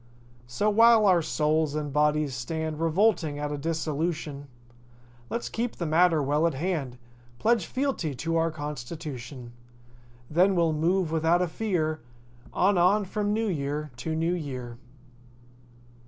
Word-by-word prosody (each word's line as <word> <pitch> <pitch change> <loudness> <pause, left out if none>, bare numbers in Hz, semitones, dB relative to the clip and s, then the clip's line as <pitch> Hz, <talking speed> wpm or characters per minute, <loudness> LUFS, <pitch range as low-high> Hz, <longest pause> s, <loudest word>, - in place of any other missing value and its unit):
So 120 - -1
while 230 0 +6
our 185 -3 +5
souls 155 -1 0
and 150 -2 -3
bodies 150 -1 +2
stand 155 +5 -4
Revolting 165 -3 +2
at 145 0 -3
a - - -2
dissolution, 155 -2 -3 0.8
Let's 235 - -3
keep 235 +1 -3
the 170 - -4
matter 160 -1 +3
well 150 +4 +2
at 160 - -2
hand— 145 -5 -2 0.4
Pledge 225 - +1
fealty 255 - -2
to 165 +6 -2
our 165 0 +2
constitution. 145 -4 -7 0.7
Then 180 +7 +3
we'll 165 -2 +2
move 170 +2 +1
without 165 +2 +2
a - - 0
fear 160 - -2 0.5
On, 190 0 +2
on 195 +4 +3
from 205 +2 -2
New 220 +1 0
Year 150 -3 -3
to 160 +5 -3
New 165 +2 0
Year. 130 -8 -5
160 Hz, 140 wpm, -27 LUFS, 150-180 Hz, 0.8 s, while